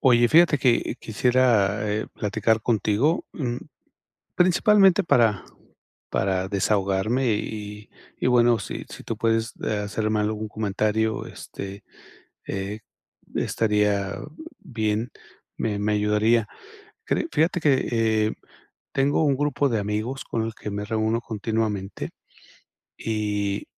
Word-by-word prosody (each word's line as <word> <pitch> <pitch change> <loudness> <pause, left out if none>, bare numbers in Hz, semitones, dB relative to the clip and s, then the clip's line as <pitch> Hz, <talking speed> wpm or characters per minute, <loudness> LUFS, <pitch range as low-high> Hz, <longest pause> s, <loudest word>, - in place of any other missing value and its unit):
Oye, 120 -2 +5
fíjate 160 -1 +5
que 125 -3 +2
quisiera, 110 -3 +2
eh, 105 +1 -1
platicar 110 +1 +1
contigo, 115 - +1
mm, 125 -6 -3 0.8
principalmente 190 +1 +5
para 115 - +3 0.7
para 95 -1 0
desahogarme 100 +4 +1
y 105 0 -6 0.3
y - - -1
bueno, 120 -1 +4
si - - -6
si - - -10
tú 115 - -3
puedes, 115 0 0
de, 105 -1 -2
ah, - - -3
hacerme 110 +1 -1
algún 105 +1 -2
comentario, 110 +1 -1
este, 100 +1 -8 0.6
eh, 100 +2 -4 0.6
estaría 105 -2 +1 0.4
bien, 110 -1 -2 0.5
me 105 -2 -1
me 105 +1 +1
ayudaría. 105 +2 +2 0.6
Cre - - 0
fíjate 165 +3 +2
que, 150 -3 +4 0.5
eh, - - -2 0.6
tengo 140 +3 +2
un 140 -2 +3
grupo 145 0 +1
de 115 -3 0
amigos 105 +6 -3
con 115 - -2
el 115 0 -4
que - - -6
me 105 +1 -3
reúno 110 +2 0
continuamente, 110 -3 -3 0.9
y 105 -2 -2
110 Hz, 120 wpm, -24 LUFS, 105-120 Hz, 0.9 s, Oye